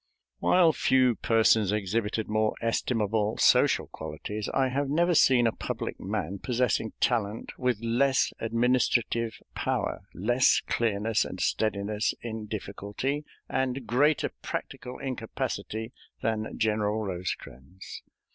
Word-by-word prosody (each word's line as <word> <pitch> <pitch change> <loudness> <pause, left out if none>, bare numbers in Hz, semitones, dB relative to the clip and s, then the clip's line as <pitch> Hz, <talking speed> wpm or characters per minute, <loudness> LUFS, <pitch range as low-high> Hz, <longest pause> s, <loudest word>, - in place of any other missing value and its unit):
While 175 -3 +4
few 130 -3 +3
persons 110 -3 +3
exhibited 105 +1 -1
more 110 0 +1
estimable 110 -2 0
social - - +4
qualities, 105 0 -6
I 135 -1 +2
have 140 +2 -1
never 170 +4 +2
seen 130 -6 +5
a 115 - +3
public - - -5
man 95 +6 -3
possessing 120 -2 0
talent 110 -3 0
with 125 -4 +1
less 130 +3 +2
administrative 115 0 +1 0.2
power, - - -1 0.2
less 120 +7 +3
clearness 110 -1 +1
and 95 - -7
steadiness 105 +1 0
in 110 -2 -6
difficulty, 110 +7 -4 0.2
and 130 -1 -1
greater 145 +6 +2
practical 125 - -5
incapacity 115 -3 -4 0.3
than 110 -1 -2
General 110 -1 0
Rosecrans. 90 -3 -6
115 Hz, 110 wpm, -28 LUFS, 105-125 Hz, 0.3 s, seen